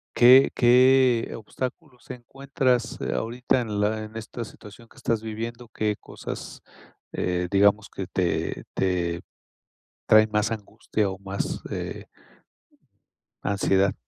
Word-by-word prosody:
¿qué 130 +3 +8
qué 125 0 +4
obstáculos 125 +3 -7
encuentras 130 -1 -1
ahorita 125 +2 0
en 105 -3 -3
la 110 +1 0
en 110 +1 -11
esta 115 +1 -6
situación 105 +2 -13
que - - -21
estás 115 -2 -1
viviendo?, 115 +2 -6
¿qué 105 -1 0
cosas, - - -8 0.5
eh, 90 -1 -1
digamos 100 +1 +3
que 95 - -6
te 90 -2 -1
te 90 -2 -1 0.8
traen 110 0 +6
más 105 +1 +1
angustia 105 -1 -2
o 95 - -7
más, 100 0 -4
eh? - - -5 1.4
¿ansiedad? 95 -1 +2
110 Hz, 115 wpm, -25 LUFS, 100-120 Hz, 1.4 s, qué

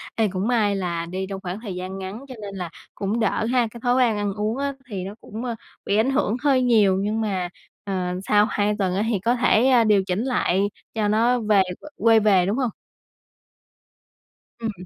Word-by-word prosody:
Ê, 220 -1 +2
cũng 190 +3 -2
may 215 -5 +2
là 170 -3 -2
đi 185 +3 -4
trong 195 -1 -5
khoảng 185 +2 -5
thời 205 -6 -6
gian 185 +1 -5
ngắn 195 +7 -7
cho 255 - -8
nên 200 -1 -7
là 180 -3 -4 0.3
cũng 205 +4 -2
đỡ 220 0 +1
ha, 250 -2 +3
cái 235 - -10
thói 245 0 +3
quen 240 -4 +3
ăn 205 -1 -1
uống 215 +4 -2
á, 280 0 -1
thì 195 -5 -5
nó 195 +2 -7
cũng, 220 +3 -7
ơ, 235 -2 -2 0.3
bị 200 - +1
ảnh 230 +5 +3
hưởng 235 -4 +1
hơi 275 -3 +3
nhiều, 210 -6 +4
nhưng 215 +2 -1
mà, 190 -5 -1 0.3
ờ, 185 -2 -2
sau 210 0 +5
2 210 0 +1
tuần 185 -2 0
á 195 - +1
hì 220 -2 0
có 235 +6 +1
thể, 245 0 +3
a, 250 -3 +5
điều 210 -3 +4
chỉnh 185 +6 0
lại 200 -7 +1 0.3
cho 215 -2 0
nó 230 +4 +3
về 210 -3 +3 0.2
q - - -11
quay 225 -1 +5
về, 200 -4 +4
đúng 200 +6 0
hông? 255 -4 0 1.9
Ừm. 225 -1 -2
210 Hz, 220 wpm, -23 LUFS, 195-235 Hz, 1.9 s, sau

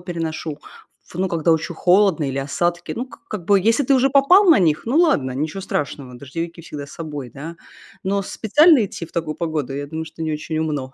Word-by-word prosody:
переношу. 165 -4 -4 0.5
В - - -19
ну, 190 - +1
когда 170 -2 0
очень 160 +1 -1
холодно 180 -2 +3
или 135 +1 -3
осадки, 175 +5 -2
ну, 240 +2 -3
к - - -17
как 195 -6 -5
бы, 200 -1 +5
если 225 +8 +2
ты 275 +1 +3
уже 265 +1 +3
попал 285 +10 +6
на 330 - +7
них, 155 -4 +2
ну, 245 +6 -1
ладно, 290 - +2
ничего 150 +8 -3
страшного, 140 -7 -4
дождевики 165 +7 -6
всегда 145 -3 -7
с - - -13
собой, 145 -6 -7
да. 160 +5 -8 0.5
Но 200 +1 0
специально 280 - +4
идти 175 -3 -7
в - - -21
такую 160 -2 -2
погоду, 155 -6 -3
я 145 +1 -4
думаю, 160 +1 -4
что 160 +1 -9
не 160 -1 -1
очень 155 +1 -4
умно. 145 -4 -2
165 Hz, 215 wpm, -21 LUFS, 150-200 Hz, 0.5 s, на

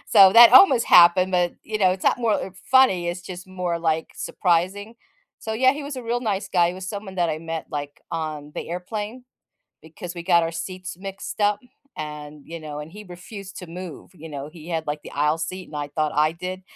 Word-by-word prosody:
So 190 -1 +7
that 235 0 +10
almost 260 -4 +7
happened 180 +2 +6
but, 175 -1 +1
you 220 - -3
know, 185 -2 +4
it's 185 +1 -4
not - - +3
more, 230 -3 +1
uh, - - -3 0.2
funny, 225 -10 +4
it's 175 +1 -4
just 180 0 -9
more, 180 -2 -3
like, 160 -1 0
surprising. 190 +5 -1 0.5
So 220 - -4
yeah, 260 +3 +4
he 295 +1 -6
was 285 -1 -6
a 255 - -6
real 240 +1 -1
nice 200 -4 -2
guy, 175 -2 +3
he 175 - -4
was 185 0 -7
someone 200 -2 -7
that 175 -2 +1
I 155 - -3
met, 165 -2 -5
like, 145 0 -6
on 155 -3 -5
the - - -6
airplane, 210 +7 -5 0.6
because 165 +3 -9
we 170 - -6
got 170 -1 +4
our 165 - -3
seats 185 +2 -6
mixed 195 +2 -7
up 205 0 +3 0.4
and, 150 -1 -7
you 165 0 -8
know, 150 -1 -7
and 150 +3 -10
he 210 - -10
refused 195 +2 -10
to 180 - -8
move, 175 -1 -9
you 165 -2 -11
know, 145 -1 -6
he 165 -1 -12
had, 165 -2 -3
like, 150 0 -3
the - - -10
aisle 150 +2 +1
seat 185 +3 -5
and 150 - -8
I 145 -1 -4
thought 150 +1 -1
I 155 +1 +3
did. 185 +2 -6
180 Hz, 225 wpm, -23 LUFS, 160-195 Hz, 0.6 s, that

